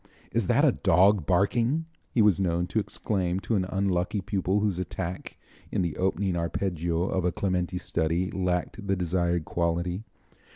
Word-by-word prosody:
"Is - - 0
that - - +4
a - - +6
dog 95 -1 +3
barking?" 115 - +2 0.2
he 115 - +3
was 105 -4 +4
known 85 -2 +1
to 110 - +1
exclaim 95 -3 -1
to 115 - -2
an 95 -2 +1
unlucky 95 +1 0
pupil 95 0 0
whose 100 -4 0
attack 90 0 -5 0.3
in - - +1
the 85 -4 -2
opening 95 0 0
arpeggio 85 -1 -1
of 95 -1 -1
a 90 - +2
Clementi 90 -1 -1
study 85 +1 -1
lacked 90 +3 -2
the 95 - +2
desired 85 -2 0
quality. 85 +3 -1
90 Hz, 160 wpm, -27 LUFS, 85-100 Hz, 0.3 s, a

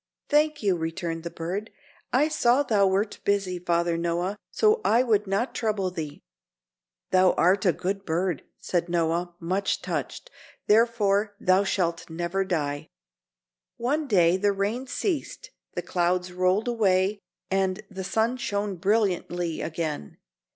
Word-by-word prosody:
"Thank 300 -2 +2
you," 195 -3 +3
returned 165 0 -3
the 170 - -5
bird. 185 +7 -4 0.4
"I 275 +5 +3
saw 260 -3 +3
thou 205 -7 +3
wert 200 +3 0
busy, 195 -3 0
Father 170 -1 0
Noah, 170 +3 -1
so 435 +1 +3
I 235 - +4
would 210 -4 +2
not 200 +6 0
trouble 210 -5 -1
thee." 155 -5 -6 0.9
"Thou 185 -1 +5
art 190 +3 +3
a - - +6
good 195 +3 -3
bird," 175 -2 -1 0.2
said 175 -1 -2
Noah, 170 +1 0
much 185 +4 -1
touched, - - -4 0.3
"therefore 210 -2 +3
thou 185 +1 +3
shalt 170 -4 -1
never 170 +4 -1
die." 155 -5 -2 0.9
One 285 +6 -1
day 180 -6 +4
the 205 +1 +2
rain 210 +7 -2
ceased, 390 - -3 0.2
the - - -2
clouds 180 0 0
rolled 185 +5 +1
away 200 -3 +2 0.3
and 190 -1 0
the 190 -1 -5
sun 220 +6 0
shone 205 -5 -2
brilliantly 180 -4 0
again. 155 - -4
190 Hz, 135 wpm, -26 LUFS, 175-215 Hz, 0.9 s, a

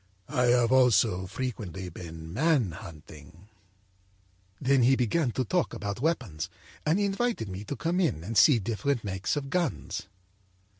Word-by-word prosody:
â'I 125 -3 +3
have 120 0 +2
also 115 -7 +4
frequently 100 -6 -5
been 80 -2 -9
man 135 - +2
hunting.' 80 0 -12 1.1
âThen 135 -1 +4
he 130 +3 +5
began 125 +4 +1
to 130 - -1
talk 180 +8 0
about 100 +2 -4
weapons, 130 - -1 0.4
and 160 +4 +3
he 205 - +2
invited 200 - -1
me 95 +1 -6
to 145 - -4
come 170 +5 -1
in 130 - 0
and 110 +6 -5
see 140 +3 +7
different 115 +4 -1
makes 95 +2 -2
of 140 -2 -4
guns. 175 - -2
120 Hz, 150 wpm, -28 LUFS, 95-140 Hz, 1.1 s, see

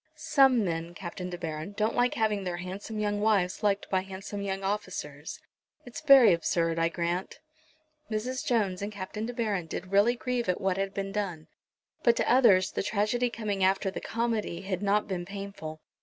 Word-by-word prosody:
"Some 270 -7 +4
men, 165 0 -3
Captain 180 0 -6
De 175 - -5
Baron, 160 +2 -5
don't 215 +1 +1
like 245 0 +2
having 215 -3 +1
their 180 -2 -3
handsome 190 +5 -6
young 205 -1 -1
wives 200 -4 +2
liked 205 -2 +1
by 190 -1 +2
handsome 195 +2 -7
young 195 -1 -3
officers. 185 -7 -4 0.5
It's 245 +5 -8
very 270 - +8
absurd, 165 0 0
I 165 0 +2
grant." 175 +5 -3 0.7
Mrs. 240 +4 -2
Jones 200 -6 0
and 205 +1 -3
Captain 210 +2 -5
De 245 - -5
Baron 205 -8 -1
did 185 +3 -6
really 205 +5 +4
grieve 245 -3 -2
at 180 - +1
what 190 -1 0
had 195 0 -2
been 195 0 -3
done, 185 -7 -4 0.5
but 235 -1 +4
to - - 0
others, 210 -7 +5
the - - -2
tragedy 215 +4 0
coming 210 -5 -2
after 190 0 +2
the - - -6
comedy 230 -6 -2
had 190 -1 -3
not 205 +1 +2
been 185 -3 -3
painful. 195 -5 -7
200 Hz, 185 wpm, -29 LUFS, 180-220 Hz, 0.7 s, very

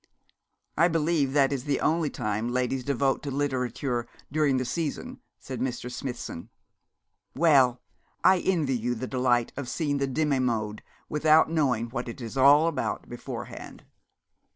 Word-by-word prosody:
'I 170 - +6
believe 160 -4 +1
that 140 -1 +3
is 135 -2 -4
the 140 -2 0
only 160 -1 +1
time 105 0 -2
ladies 125 +1 -1
devote 135 0 0
to 145 - -5
literature 130 -3 -2 0.2
during 145 -3 +2
the 130 - -1
season,' 170 - -4 0.2
said 130 -3 -7
Mr. 125 -1 -3
Smithson. 125 -9 -6 0.9
'Well, 135 -6 +4 0.4
I 185 +1 +6
envy 160 -8 +1
you 120 +1 -1
the 120 - -4
delight 125 -2 +1
of 135 -3 -5
seeing 145 -3 -1
the 140 - 0
Demi 145 0 0
monde 110 -4 -1 0.3
without 155 +1 +4
knowing 125 -8 0
what 120 -1 -4
it 115 - -8
is 115 0 -7
all 140 +4 +6
about 155 -5 -3
beforehand.' - - -8
135 Hz, 150 wpm, -27 LUFS, 125-150 Hz, 0.9 s, I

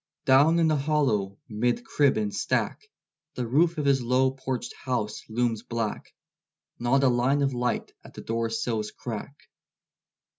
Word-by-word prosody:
Down 145 +5 +5
in 165 -1 +4
the 155 - +3
hollow, 135 -10 0
'mid 120 - -1
crib 145 - +2
and 105 -2 -1
stack, - - -1 0.5
The 125 - -2
roof 165 +7 +2
of 150 - -1
his 135 -2 +3
low 130 +2 +2
porched 130 -2 -4
house 120 -6 -3
looms 115 -1 0
black; 115 -2 -4 0.6
Not 130 +3 +2
a - - +5
line 130 +3 +2
of 135 -1 +1
light 125 0 -2
at - - -15
the - - -7
doorsill's 115 -1 -2
crack. 120 +4 -7
125 Hz, 150 wpm, -26 LUFS, 115-140 Hz, 0.6 s, Down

